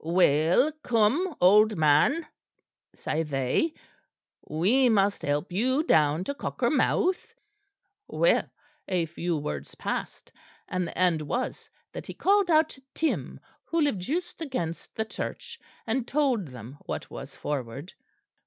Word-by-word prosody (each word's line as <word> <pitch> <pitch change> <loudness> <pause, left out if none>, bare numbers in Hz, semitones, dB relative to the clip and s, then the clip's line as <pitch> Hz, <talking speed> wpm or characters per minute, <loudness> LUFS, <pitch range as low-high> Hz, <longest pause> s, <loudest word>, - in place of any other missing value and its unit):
"'Well, 170 - +3
come, 255 - +2
old 210 +3 +5
man,' 155 - +3 0.7
say 155 - -2
they, 145 - 0 0.7
'we 220 +12 +3
must 205 -2 +2
help 145 +5 -1
you 255 - +1
down 155 - +3
to 280 - -3
Cockermouth.' 360 +5 0 0.7
"Well, - - +2 0.4
a 180 -3 0
few 170 +1 -2
words 75 - -5
passed; - - -5 0.4
and 180 -1 -2
the - - -9
end 180 -4 +3
was 240 - -3 0.2
that - - -8
he - - -7
called 400 -1 +3
out 315 -1 +4
to 265 - -13
Tim, 320 - -1 0.3
who 335 - -1
lived 290 - +1
just 340 - -3
against 215 - -4
the 220 - -1
church; 465 - -6 0.3
and 235 +2 -1
told 260 - +1
them 125 +2 -10
what - - -5
was - - -8
forward. 140 +3 -5
200 Hz, 130 wpm, -27 LUFS, -, 0.7 s, old